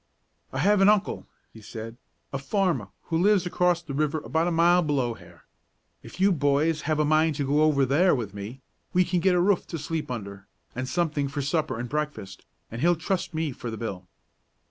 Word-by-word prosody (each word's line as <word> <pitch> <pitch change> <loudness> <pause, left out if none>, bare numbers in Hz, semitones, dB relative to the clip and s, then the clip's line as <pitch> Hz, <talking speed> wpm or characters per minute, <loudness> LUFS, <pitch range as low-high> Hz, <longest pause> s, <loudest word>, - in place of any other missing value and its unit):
"I - - -5
have 205 -1 +3
an 195 - +7
uncle," 210 -2 +1 0.3
he 110 - -13
said, 115 +1 -8 0.4
"a 135 - -2
farmer, 165 - 0 0.2
who 165 - +2
lives 195 0 +3
across 180 -1 +1
the 150 -4 -7
river 150 +2 0
about 160 +3 0
a - - 0
mile 170 +2 +4
below 140 -7 0
here. - - -16 0.6
If - - -12
you 195 +1 +4
boys 150 0 +1
have 155 - +2
a 150 - +2
mind 155 +1 +3
to 140 -1 -2
go 145 +3 +2
over 150 -3 +4
there 155 +8 +3
with 110 -6 -4
me, 105 +6 -8 0.3
we 180 0 +4
can 175 0 0
get 185 +1 +3
a - - +3
roof 190 +1 +2
to 165 - -5
sleep 155 0 -4
under, 100 -5 -7 0.3
and 130 +1 -4
something 150 -1 0
for 140 +1 -3
supper 140 -4 -1
and 120 - -4
breakfast, 150 -9 -5 0.2
and 115 +2 -6
he'll 175 +1 +4
trust 175 +1 -3
me 160 -2 -1
for 120 -1 -7
the 110 - -5
bill." 95 -5 -6
150 Hz, 210 wpm, -26 LUFS, 130-175 Hz, 0.6 s, an